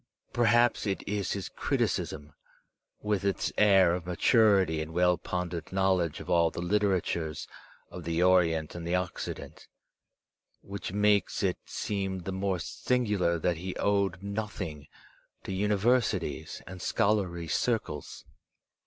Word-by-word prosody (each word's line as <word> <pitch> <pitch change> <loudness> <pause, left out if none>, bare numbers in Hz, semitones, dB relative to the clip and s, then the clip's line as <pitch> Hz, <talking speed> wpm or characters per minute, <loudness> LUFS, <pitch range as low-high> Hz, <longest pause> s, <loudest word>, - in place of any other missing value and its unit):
Perhaps 120 -1 +3
it 95 - -3
is 100 -2 -1
his 100 -2 -4
criticism, 75 0 -2 0.7
with 105 -2 0
its 100 -1 0
aur 95 -4 +6
of 90 -1 -4
maturity 95 -3 +3
and 80 +1 -6
well 90 0 +4
pondered 90 0 -4
knowledge 95 -4 +1
of - - -9
all 85 -2 +3
the - - -7
literatures 90 -4 0 0.4
of 90 - -8
the 85 +2 0
Orient 85 -4 +3
and 85 -1 -6
the 85 - +1
Occident, 90 -1 -5 0.9
which 100 -2 -6
makes 105 -1 +2
it - - 0
seem 95 -2 -3
the 95 - -4
more 95 0 -1
singular 100 0 0
that 85 +1 0
he 90 +2 -5
owed 100 -2 0
nothing 100 -7 -5 0.6
to - - -5
universities 105 +5 0
and 95 0 -9
scholarly 95 -7 0
circles. 110 -3 -2
95 Hz, 125 wpm, -29 LUFS, 85-100 Hz, 0.9 s, aur